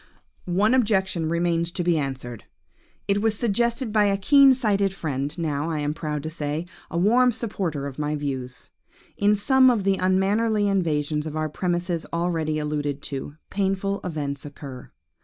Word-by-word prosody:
"One 205 Hz, +6 st, +3 dB
objection 190 Hz, -9 st, +1 dB
remains 170 Hz, 0 st, 0 dB
to 180 Hz, -, -2 dB
be 175 Hz, -1 st, +2 dB
answered. 130 Hz, -5 st, -5 dB, 0.6 s
It 200 Hz, 0 st, +1 dB
was 220 Hz, -1 st, +1 dB
suggested 235 Hz, +1 st, 0 dB
by 210 Hz, -1 st, +4 dB
a 200 Hz, -1 st, +2 dB
keen 275 Hz, +7 st, +6 dB
sighted 200 Hz, -6 st, +1 dB
friend, 145 Hz, -4 st, -3 dB
now, 155 Hz, -2 st, -1 dB
I 160 Hz, -, -2 dB
am 145 Hz, +1 st, -1 dB
proud 150 Hz, -2 st, -4 dB
to 155 Hz, -, -3 dB
say, 155 Hz, +1 st, -3 dB, 0.2 s
a 170 Hz, -, -3 dB
warm 240 Hz, +7 st, +4 dB
supporter 185 Hz, -11 st, -3 dB
of 140 Hz, 0 st, -7 dB
my 150 Hz, 0 st, -1 dB
views. 130 Hz, -4 st, -5 dB, 0.4 s
In 205 Hz, +1 st, +3 dB
some 260 Hz, +5 st, +5 dB
of 230 Hz, -5 st, +1 dB
the 195 Hz, 0 st, +2 dB
unmannerly 205 Hz, +3 st, +2 dB
invasions 155 Hz, -5 st, 0 dB
of 155 Hz, -, -6 dB
our 155 Hz, 0 st, -1 dB
premises 175 Hz, +1 st, -2 dB
already 165 Hz, -2 st, -1 dB
alluded 150 Hz, -2 st, -2 dB
to, 140 Hz, +1 st, -4 dB, 0.2 s
painful 195 Hz, 0 st, -1 dB
events 145 Hz, -5 st, -1 dB
occur. 140 Hz, -3 st, -9 dB
170 Hz, 160 wpm, -24 LUFS, 150-200 Hz, 0.6 s, keen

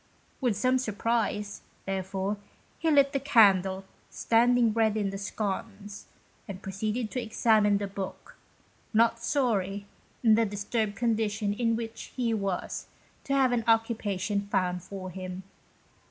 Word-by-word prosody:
With 240 Hz, -6 st, +1 dB
some 255 Hz, +4 st, +2 dB
surprise, 215 Hz, -2 st, -1 dB, 0.2 s
therefore, 195 Hz, +1 st, -2 dB, 0.4 s
he 325 Hz, -, +1 dB
lit 280 Hz, -2 st, +4 dB
the 275 Hz, -, +1 dB
candle 195 Hz, -8 st, +4 dB, 0.2 s
standing 235 Hz, 0 st, +3 dB
ready 220 Hz, -1 st, +2 dB
in 200 Hz, -2 st, -1 dB
the 195 Hz, -, -5 dB
sconce, 205 Hz, 0 st, -5 dB, 0.4 s
and 195 Hz, -2 st, -6 dB
proceeded 215 Hz, +4 st, -3 dB
to 250 Hz, -, -2 dB
examine 215 Hz, -2 st, +3 dB
the 200 Hz, -, -2 dB
book, 195 Hz, -1 st, -7 dB, 0.6 s
not 230 Hz, +1 st, +4 dB
sorry, 205 Hz, -8 st, 0 dB, 0.4 s
in 225 Hz, -2 st, +6 dB
the 225 Hz, +1 st, +4 dB
disturbed 205 Hz, +1 st, -2 dB
condition 215 Hz, -2 st, 0 dB
in 230 Hz, +1 st, +1 dB
which 225 Hz, 0 st, -6 dB
he 240 Hz, -3 st, 0 dB
was, 195 Hz, -4 st, -3 dB, 0.4 s
to 275 Hz, -, 0 dB
have 265 Hz, -2 st, +4 dB
an 240 Hz, -2 st, +1 dB
occupation 210 Hz, -3 st, +1 dB
found 180 Hz, -2 st, 0 dB
for 185 Hz, 0 st, -7 dB
him. 185 Hz, +1 st, -6 dB
215 Hz, 135 wpm, -28 LUFS, 195-230 Hz, 0.6 s, in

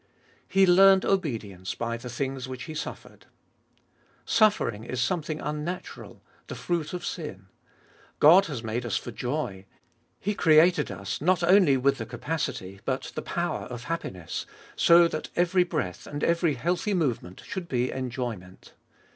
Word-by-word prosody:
He 195 Hz, 0 st, +4 dB
learned 190 Hz, +1 st, +6 dB
obedience 110 Hz, -, -2 dB
by 115 Hz, 0 st, -2 dB
the 120 Hz, +1 st, -8 dB
things 130 Hz, +1 st, -3 dB
which 130 Hz, -1 st, -6 dB
He 155 Hz, -, -7 dB
suffered. 150 Hz, -, -8 dB, 1.0 s
Suffering 205 Hz, -, +2 dB
is 125 Hz, +2 st, -4 dB
something 155 Hz, +3 st, -1 dB
unnatural, 150 Hz, +5 st, -6 dB, 0.2 s
the -, -, -6 dB
fruit 170 Hz, -3 st, -2 dB
of 180 Hz, -, -5 dB
sin. 125 Hz, -, -6 dB, 0.7 s
God 175 Hz, +6 st, +7 dB
has 135 Hz, -7 st, -5 dB
made 115 Hz, +2 st, -2 dB
us 110 Hz, -4 st, -1 dB
for 120 Hz, -, -6 dB
joy. 120 Hz, -6 st, -4 dB, 0.5 s
He 205 Hz, -, -1 dB
created 160 Hz, -2 st, +4 dB
us 100 Hz, -, -5 dB
not 180 Hz, +2 st, +2 dB
only 175 Hz, -6 st, +5 dB
with 135 Hz, +1 st, +1 dB
the 115 Hz, -, -5 dB
capacity, 115 Hz, -, -4 dB
but 130 Hz, 0 st, -3 dB
the -, -, -4 dB
power 175 Hz, 0 st, -3 dB
of 120 Hz, -1 st, -7 dB
happiness, 95 Hz, -, -5 dB, 0.3 s
so 170 Hz, 0 st, +6 dB
that 155 Hz, -2 st, -5 dB
every 180 Hz, +1 st, +3 dB
breath 145 Hz, -, -4 dB
and 145 Hz, 0 st, -5 dB
every 170 Hz, -3 st, +2 dB
healthy 180 Hz, -, -1 dB
movement 120 Hz, -, -2 dB
should 190 Hz, -4 st, -5 dB
be 125 Hz, -4 st, 0 dB
enjoyment. 120 Hz, -8 st, -6 dB
150 Hz, 145 wpm, -27 LUFS, 120-175 Hz, 1.0 s, God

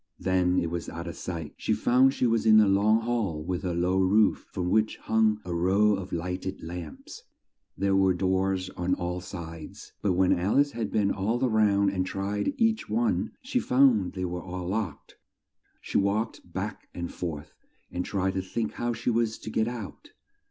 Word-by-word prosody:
then 90 Hz, -1 st, +1 dB
it 85 Hz, -2 st, 0 dB
was 85 Hz, -1 st, -4 dB
out 85 Hz, +1 st, -6 dB
of 85 Hz, -2 st, -6 dB
sight. 85 Hz, -4 st, -6 dB
She -, -, 0 dB
found 130 Hz, +2 st, +4 dB
she -, -, +1 dB
was 115 Hz, -1 st, +2 dB
in 110 Hz, 0 st, +8 dB
a 105 Hz, -, +5 dB
long 105 Hz, +3 st, +3 dB
hall 110 Hz, -10 st, -1 dB
with 90 Hz, +1 st, -3 dB
a 90 Hz, -2 st, -1 dB
low 90 Hz, +2 st, +1 dB
roof, 100 Hz, +3 st, +3 dB
from 90 Hz, -2 st, -2 dB
which 110 Hz, 0 st, +2 dB
hung 110 Hz, -1 st, +2 dB
a 90 Hz, -, -3 dB
row 95 Hz, +5 st, +3 dB
of 95 Hz, -2 st, -4 dB
light 90 Hz, +2 st, -3 dB
ed 95 Hz, -, -5 dB
lamps. 85 Hz, -2 st, -8 dB, 0.6 s
There 100 Hz, 0 st, +1 dB
were 95 Hz, -1 st, +4 dB
doors 95 Hz, 0 st, 0 dB
on 90 Hz, +1 st, -1 dB
all 90 Hz, +1 st, -3 dB
sides, 85 Hz, -3 st, -9 dB
but 100 Hz, -3 st, +1 dB
when 90 Hz, +1 st, +3 dB
Al 95 Hz, +7 st, 0 dB
ice 145 Hz, 0 st, +4 dB
had 115 Hz, -4 st, -3 dB
been 100 Hz, -2 st, +2 dB
all 105 Hz, +5 st, -1 dB
round 100 Hz, -3 st, +3 dB
and 95 Hz, -1 st, 0 dB
tried 100 Hz, +2 st, -2 dB
each 225 Hz, -1 st, +1 dB
one, 235 Hz, +1 st, 0 dB
she 255 Hz, 0 st, 0 dB
found 125 Hz, -, +3 dB
they 95 Hz, -2 st, -3 dB
were 90 Hz, 0 st, -4 dB
all 90 Hz, 0 st, -6 dB
locked. 100 Hz, -4 st, -4 dB, 0.6 s
She -, -, 0 dB
walked 100 Hz, +3 st, -1 dB
back -, -, -5 dB
and 85 Hz, 0 st, -5 dB
forth 80 Hz, -5 st, -5 dB, 0.4 s
and 90 Hz, -, -2 dB
tried 95 Hz, -1 st, -1 dB
to 95 Hz, -, -1 dB
think 110 Hz, +4 st, -3 dB
how 120 Hz, 0 st, -2 dB
she 120 Hz, -, -1 dB
was 115 Hz, -1 st, 0 dB
to 110 Hz, -, -8 dB
get 110 Hz, +1 st, +1 dB
out. 120 Hz, -5 st, -7 dB
95 Hz, 195 wpm, -27 LUFS, 90-110 Hz, 0.6 s, in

